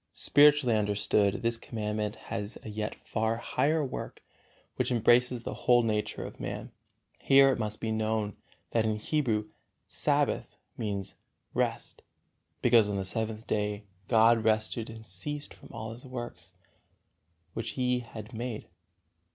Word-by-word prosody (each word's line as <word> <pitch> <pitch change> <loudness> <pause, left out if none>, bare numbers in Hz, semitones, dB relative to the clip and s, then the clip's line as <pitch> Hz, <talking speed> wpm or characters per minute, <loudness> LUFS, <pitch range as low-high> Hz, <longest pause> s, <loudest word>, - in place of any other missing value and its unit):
XVII. - - -22
Spiritually 145 -4 +6
understood, 105 0 +1
this 115 0 +1
Commandment 105 -2 -3 0.2
has 105 -1 -4
a - - -7
yet 105 +1 -3
far 110 0 -1
higher 150 +5 +1
work, 130 - -6 0.5
which - - 0
embraces 120 +1 +4
the - - -4
whole 120 -1 +4
nature 105 -2 -1
of - - -9
man. - - -5 0.5
Here 135 0 +6
it - - -1
must 105 -1 -2
be 115 - -2
known 110 -2 0 0.4
that 115 - +2
in 110 -1 +1
Hebrew 110 -3 0 0.4
"Sabbath" - - 0 0.2
means 100 -3 -3 0.4
"rest," - - -1 0.6
because 115 -4 +5
on 100 - -1
the 95 - -2
seventh 110 +2 -3
day 105 0 -1 0.2
God 115 0 +5
rested 110 +1 +1
and 110 0 -10
ceased 145 +11 -5
from - - -15
all 110 +1 -6
His 120 - -13
works, 125 -2 -7 1.0
which 115 - -4
He 125 -1 +2
had 115 -2 -9
made. 115 -1 -5
110 Hz, 145 wpm, -30 LUFS, 105-120 Hz, 1.0 s, Spiritually